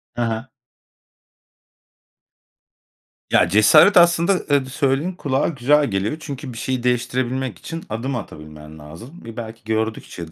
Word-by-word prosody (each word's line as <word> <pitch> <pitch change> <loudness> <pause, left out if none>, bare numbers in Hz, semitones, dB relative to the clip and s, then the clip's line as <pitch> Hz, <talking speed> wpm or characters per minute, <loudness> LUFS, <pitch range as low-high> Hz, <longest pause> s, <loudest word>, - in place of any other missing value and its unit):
Hı 120 - -3
hı. 115 +1 -2 2.9
Ya, - - +4
cesaret 200 -2 +6
aslında, 170 +1 +5
ııı, 145 -6 0
d 130 - -10
söylediğin 140 +5 0
kulağa 140 -6 -1
güzel 145 0 +2
geliyor. 100 +8 -2
Çünkü 140 -4 -7
bir 115 - -10
şeyi 130 +1 -3
değiştirebilmek 125 -2 -1
için 165 0 -7
adım 120 +5 -3
atabilmen 75 -7 -9
lazım. 95 - -12
E, 115 0 -9
belki 115 -1 -8
gördükçe 110 -6 -4
125 Hz, 130 wpm, -21 LUFS, 110-145 Hz, 2.9 s, cesaret